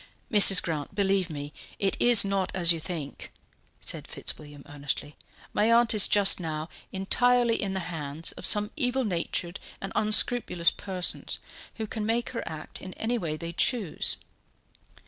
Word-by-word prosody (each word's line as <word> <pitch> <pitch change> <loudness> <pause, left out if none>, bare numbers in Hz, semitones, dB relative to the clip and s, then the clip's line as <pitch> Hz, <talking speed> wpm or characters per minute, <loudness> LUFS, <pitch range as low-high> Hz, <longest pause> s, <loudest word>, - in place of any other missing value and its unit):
"Mrs. 200 -3 +9
Grant, 155 -4 -5
believe 195 -2 0
me, 145 -1 -7 0.2
it 195 -1 -1
is 240 -4 +7
not 195 -1 -1
as 175 -2 +5
you 165 - -5
think," 155 -4 -7 0.5
said - - -4
Fitzwilliam 145 -2 -5
earnestly. 145 0 -5 0.4
"My 215 +2 +2
aunt 235 0 +4
is 210 -2 +6
just 200 -2 +5
now 160 -1 -5 0.2
entirely 240 +4 +1
in 195 -2 -2
the 190 - -2
hands 160 -2 -6
of - - -12
some 210 0 +2
evil 260 -3 -1
natured 175 -1 -3 0.2
and 195 - -7
unscrupulous 215 -4 +2
persons, 185 -3 -3 0.4
who 220 - -5
can 215 0 -5
make 230 +2 -1
her 235 - -4
act 155 -1 -9
in 185 - -10
any 235 +2 -2
way 155 -5 -4
they 170 +1 -6
choose." 205 - 0
190 Hz, 155 wpm, -26 LUFS, 165-220 Hz, 0.5 s, Mrs